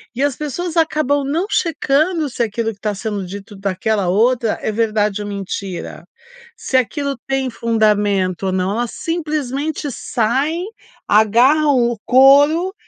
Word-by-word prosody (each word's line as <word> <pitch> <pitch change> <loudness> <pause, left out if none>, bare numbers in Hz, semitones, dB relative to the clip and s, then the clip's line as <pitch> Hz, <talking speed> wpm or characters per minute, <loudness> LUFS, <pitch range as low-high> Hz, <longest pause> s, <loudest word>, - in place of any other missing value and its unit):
E 255 - -3
as 285 -3 +1
pessoas 320 +4 -4
acabam 305 -3 +1
não 315 +7 -1
checando 315 -1 +1
se 245 - -5
aquilo 225 0 -2
que 200 - -24
tá 210 -1 -2
sendo 205 -1 -4
dito 200 +3 -9
daquela 195 +1 -1
outra 230 +4 +2
é - - -1
verdade 215 -2 0
ou 205 - -5
mentira, 195 -2 -6 0.5
se 265 - -1
aquilo 280 +2 -1
tem 270 -1 -1
fundamento 205 -5 +1
ou - - 0
não. 185 +1 -1
Elas 235 +2 -2
simplesmente 300 -3 -3
saem, 270 - -1 0.4
agarram 255 +8 +4
o 240 - -4
couro 285 +8 +5
240 Hz, 140 wpm, -18 LUFS, 210-290 Hz, 0.5 s, couro